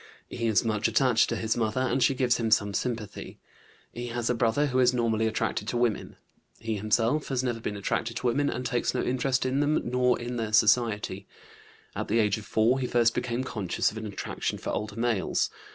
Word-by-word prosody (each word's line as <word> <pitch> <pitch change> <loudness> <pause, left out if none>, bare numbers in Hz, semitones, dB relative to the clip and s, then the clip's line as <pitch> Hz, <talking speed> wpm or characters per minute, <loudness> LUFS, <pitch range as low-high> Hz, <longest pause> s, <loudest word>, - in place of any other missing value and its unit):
He 115 -1 -2
is 110 +1 +2
much 110 -1 +1
attached 125 -4 +3
to - - -1
his 110 0 -1
mother, 115 +1 0
and 130 +1 0
she 135 - +3
gives 125 -2 +2
him 115 -2 -1
some 105 -2 +2
sympathy. 115 -1 -4 0.6
He 120 +1 -5
has 120 0 -1
a - - +2
brother 115 +4 +1
who 130 -2 0
is 125 0 +4
normally 115 -2 +1
attracted 110 -1 -2
to 120 - -1
women. 120 -3 -1 0.4
He 115 0 -3
himself 115 +8 +1
has 130 -2 -1
never 120 -3 -2
been 105 -2 -4
attracted 115 +3 -2
to - - -5
women, 140 +4 +2
and 125 - -4
takes 120 -2 -1
no - - 0
interest 130 +1 0
in 130 +2 0
them 145 +1 +2
nor 125 0 +2
in 120 +1 -4
their 110 -2 -3
society. 105 -3 +2 0.7
At - - -3
the 110 - +1
age 110 -1 +2
of 105 - -12
4 115 +4 +2
he 125 - -1
first 120 -1 +3
became 125 +1 -2
conscious 105 -8 -1
of 110 - -10
an 110 - -5
attraction 100 - -4
for - - -5
older 105 -1 -4
males. 115 -3 0
115 Hz, 215 wpm, -27 LUFS, 110-125 Hz, 0.7 s, is